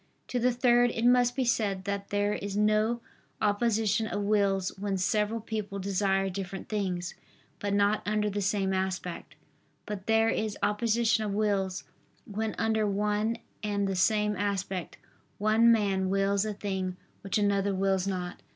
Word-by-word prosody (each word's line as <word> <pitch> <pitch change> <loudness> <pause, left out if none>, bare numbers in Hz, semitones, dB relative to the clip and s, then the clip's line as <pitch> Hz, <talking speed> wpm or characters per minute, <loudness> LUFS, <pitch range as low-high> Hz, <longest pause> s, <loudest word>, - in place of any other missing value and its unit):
To 250 - -1
the 250 +1 +3
third, 245 0 +4
it 230 0 -2
must 245 0 +4
be 260 - 0
said 205 -5 0
that 200 0 -3
there 205 0 +1
is 200 0 -4
no 215 +3 +2 0.4
opposition 220 0 +1
of 205 -1 -2
wills 200 -2 +2
when 200 -1 -1
several 210 +4 0
people 215 -2 -4
desire 195 0 +1
different 190 0 -5
things, 185 -4 -2 0.5
but 205 - -2
not 205 +1 +2
under 210 0 0
the 205 0 -2
same 195 -1 0
aspect: 185 -2 -3 0.5
but 205 -2 -6
there 225 0 +4
is 215 -2 -1
opposition 220 +2 +2
of 205 -2 -2
wills, 200 -3 0 0.4
when 215 +1 -3
under 220 -1 +1
one 210 +3 0 0.2
and 205 -1 -1
the 195 - -1
same 210 +2 +2
aspect, 195 -2 -3 0.4
one 220 +3 +4
man 195 -4 +2
wills 195 +1 +1
a 215 - -2
thing 190 -2 -3 0.2
which 195 - -1
another 200 -1 +1
wills 190 0 +1
not. 180 -2 -4
205 Hz, 155 wpm, -29 LUFS, 195-215 Hz, 0.5 s, third